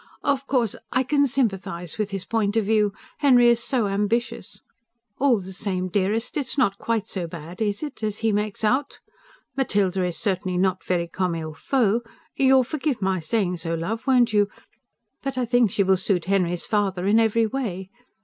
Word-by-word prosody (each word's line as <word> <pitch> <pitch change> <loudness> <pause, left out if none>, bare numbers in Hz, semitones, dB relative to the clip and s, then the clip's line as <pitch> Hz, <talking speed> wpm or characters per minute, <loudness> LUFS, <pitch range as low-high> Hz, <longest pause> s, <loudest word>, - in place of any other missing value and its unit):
"Of 280 -1 0
course, 240 -6 +1 0.2
I 260 - +2
can 285 +2 +2
sympathise 195 - -2
with 210 -1 0
his 195 -2 -4
point 220 -1 0
of 220 - +2
view.... 210 -1 +2 0.3
Henry 250 -5 +6
is 235 -1 +3
so 245 -4 +1
ambitious. 205 +4 -2 0.6
All 260 -5 +4
the 190 0 -8
same, 185 -2 -2
dearest, 205 - -1
it's 285 -1 -3
not 200 -7 +2
quite 225 -2 -1
so 180 -6 -3
bad 170 +3 -9
is 205 +4 -1
it? 295 -6 -6
as 215 -1 -2
he 220 - +4
makes 210 +1 -2
out. 260 +6 +1 0.6
Matilda 195 -8 +1
is 180 -2 -2
certainly 185 -3 -1
not 185 0 +1
very 175 -2 0
COMME 180 0 -1
IL 160 -1 -5
FAUT 230 - +1 0.3
you'll 265 -1 +5
forgive 290 -1 -2
my 190 -2 0
saying 180 +2 -1
so, 165 0 -2
love, 215 +10 -4
won't 245 -4 +4
you? 205 -1 +3 0.7
But 275 -1 -4
I 250 - +1
think 240 -1 +3
she 200 - +1
will 190 0 +3
suit 185 -2 0
Henry's 180 -2 0
father 195 -4 0
in 210 +3 +4
every 225 0 +3
way. 200 -6 -4
210 Hz, 185 wpm, -24 LUFS, 185-240 Hz, 0.7 s, Henry